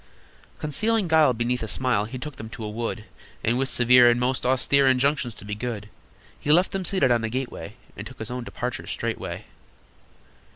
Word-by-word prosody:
Concealing 215 Hz, +7 st, 0 dB
guile 160 Hz, -4 st, +5 dB
beneath 120 Hz, +1 st, -1 dB
a 110 Hz, -, -3 dB
smile, 115 Hz, -2 st, +1 dB
He 115 Hz, +4 st, -7 dB
took 140 Hz, +2 st, -7 dB
them 110 Hz, -2 st, -8 dB
to 115 Hz, -, -8 dB
a 105 Hz, -, -4 dB
wood, 115 Hz, 0 st, -4 dB, 0.4 s
And, 120 Hz, +3 st, +1 dB
with 135 Hz, -1 st, 0 dB
severe 125 Hz, 0 st, +6 dB
and 120 Hz, 0 st, +2 dB
most 125 Hz, 0 st, 0 dB
austere 135 Hz, +2 st, +3 dB
Injunctions 130 Hz, -1 st, +1 dB
to -, -, -12 dB
be 105 Hz, -, -4 dB
good, 105 Hz, -2 st, -5 dB, 0.5 s
He 145 Hz, -, 0 dB
left 180 Hz, +4 st, +4 dB
them 195 Hz, -1 st, -3 dB
seated 180 Hz, -9 st, +2 dB
on 120 Hz, -1 st, +2 dB
a 115 Hz, -, -1 dB
gateway, 120 Hz, -6 st, -5 dB, 0.2 s
And 100 Hz, -, -7 dB
took 130 Hz, -, -13 dB
his 110 Hz, +1 st, -6 dB
own 125 Hz, 0 st, -4 dB
departure 125 Hz, +1 st, -5 dB
straightway. -, -, -4 dB
125 Hz, 195 wpm, -25 LUFS, 115-140 Hz, 0.5 s, severe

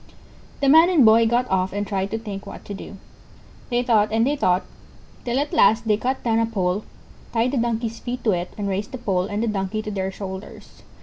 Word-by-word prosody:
The 280 Hz, -, +2 dB
Man 320 Hz, +5 st, +7 dB
and 320 Hz, -9 st, +5 dB
Boy 225 Hz, +1 st, +6 dB
got 240 Hz, +2 st, +1 dB
off 190 Hz, 0 st, +1 dB
and 205 Hz, 0 st, -2 dB
tried 195 Hz, -1 st, -2 dB
to 225 Hz, -, -2 dB
think 205 Hz, -3 st, -7 dB
what -, -, -10 dB
to 205 Hz, -, -6 dB
do. 195 Hz, 0 st, -9 dB, 0.7 s
They 245 Hz, -1 st, +1 dB
thought 220 Hz, -4 st, +3 dB
and 225 Hz, +1 st, +2 dB
they 285 Hz, +3 st, +1 dB
thought, 185 Hz, -8 st, +1 dB, 0.6 s
till 240 Hz, +1 st, -1 dB
at 290 Hz, +2 st, -1 dB
last 220 Hz, +3 st, +4 dB
they 210 Hz, -, +4 dB
cut 255 Hz, +5 st, -2 dB
down 225 Hz, -1 st, +2 dB
a 230 Hz, -, +1 dB
pole, 195 Hz, -2 st, -1 dB, 0.5 s
tied 235 Hz, +2 st, +1 dB
the 275 Hz, -, -1 dB
Donkey's 230 Hz, -1 st, -1 dB
feet 245 Hz, 0 st, -5 dB
to 220 Hz, -, +3 dB
it, 180 Hz, -1 st, -2 dB
and 205 Hz, -1 st, -3 dB
raised 200 Hz, +6 st, -3 dB
the -, -, -3 dB
pole 190 Hz, -6 st, -1 dB
and 205 Hz, +2 st, -2 dB
the -, -, 0 dB
Donkey 210 Hz, 0 st, -2 dB
to 215 Hz, -, -5 dB
their 190 Hz, -1 st, -2 dB
shoulders. 190 Hz, 0 st, -9 dB
220 Hz, 230 wpm, -23 LUFS, 195-240 Hz, 0.7 s, Man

